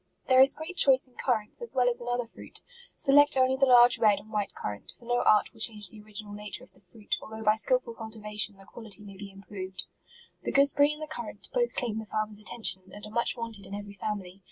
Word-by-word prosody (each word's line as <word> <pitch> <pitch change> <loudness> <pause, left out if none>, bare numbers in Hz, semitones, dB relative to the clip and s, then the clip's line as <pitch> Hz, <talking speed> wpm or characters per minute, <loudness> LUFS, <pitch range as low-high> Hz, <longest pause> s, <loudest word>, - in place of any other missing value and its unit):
There 260 0 +6
is 270 +1 +5
great 320 +4 -8
choice 265 -3 +5
in 250 - -27
currants, 230 - -1
as 475 - -8
well 250 -1 +3
as 240 -1 +1
in 240 - -8
other 245 0 -1
fruit; 230 - -9 0.3
select 290 0 +4
only 260 0 +3
the 270 0 +3
large 245 -1 +7
red 210 -3 +4
and 210 +2 -12
white 210 -2 -2
currant, 105 -1 -6
for 240 - -18
no 245 +1 +1
art 210 -1 +3
will 225 - -19
change 210 -3 +1
the 215 - -12
original 210 0 -8
nature 210 +4 -4
of - - -16
the - - -15
fruit, 205 +2 -5
although 220 0 -8
by 215 0 +4
skil 220 +4 +4
ful 235 -2 -10
cultivation, 215 -2 -1
the 195 - -16
quality 215 -1 -7
may 200 -1 -11
be 200 +1 -9
improved. 195 -1 -7 0.6
The - - -3
gooseberry 285 +1 +4
and 300 +1 -7
the - - -6
currant 310 - -6
both 485 -1 0
claim 225 -4 -2
the 220 - -8
farmer's 215 -1 -3
attention, 200 -3 -1
and 205 0 -9
are 210 - -10
much 235 +2 +2
wanted 230 -4 -7
in 200 - -6
every 205 0 -8
family. 195 -2 -5
220 Hz, 240 wpm, -28 LUFS, 205-250 Hz, 0.6 s, large